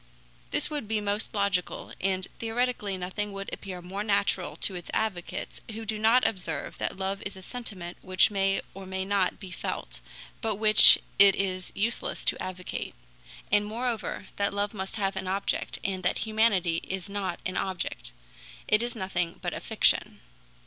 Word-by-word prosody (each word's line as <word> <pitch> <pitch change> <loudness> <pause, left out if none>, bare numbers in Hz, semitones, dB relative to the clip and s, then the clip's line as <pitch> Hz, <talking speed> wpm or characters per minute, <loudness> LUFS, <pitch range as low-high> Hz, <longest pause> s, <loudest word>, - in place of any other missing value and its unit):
This 295 - 0
would 290 -7 -3
be 220 0 +1
most 205 +1 -2
logical, 200 -4 -1
and 190 -1 0
theoretically 225 -3 -1
nothing 190 +3 -3
would 195 0 -6
appear 185 -3 -6
more 195 +3 -4
natural 200 -3 +1
to 195 - +3
its 175 -1 -7
advocates, 195 -6 -3
who 225 +1 -6
do 215 0 -2
not 225 +4 +5
observe 185 -4 -4
that - - -2
love 195 +1 -2
is 195 - -6
a 190 - -11
sentiment 190 -7 -6
which 185 +3 +4
may 195 -1 +1
or 195 -1 -9
may 190 0 -3
not 195 -2 +1
be 190 -2 -9
felt, - - -4 0.4
but 220 -3 -1
which 215 +1 +9 0.2
it 195 -1 +9
is 185 -2 -2
useless 225 +4 0
to - - +2
advocate; 185 -1 -5 0.6
and 205 0 +3
moreover, 230 -2 -3
that 200 0 +1
love 205 +1 -1
must 195 -2 -4
have 195 -2 -1
an 190 0 -3
object, 195 +2 -1
and 190 -1 -2
that 185 - 0
humanity 210 -6 +2
is 190 0 -4
not 200 -3 -3
an 185 - -2
object. 175 - -3 0.6
It 215 - +4
is 240 0 -2
nothing 185 -4 -2
but - - -3
a - - -4
fiction. - - +1
195 Hz, 170 wpm, -28 LUFS, 185-215 Hz, 0.6 s, which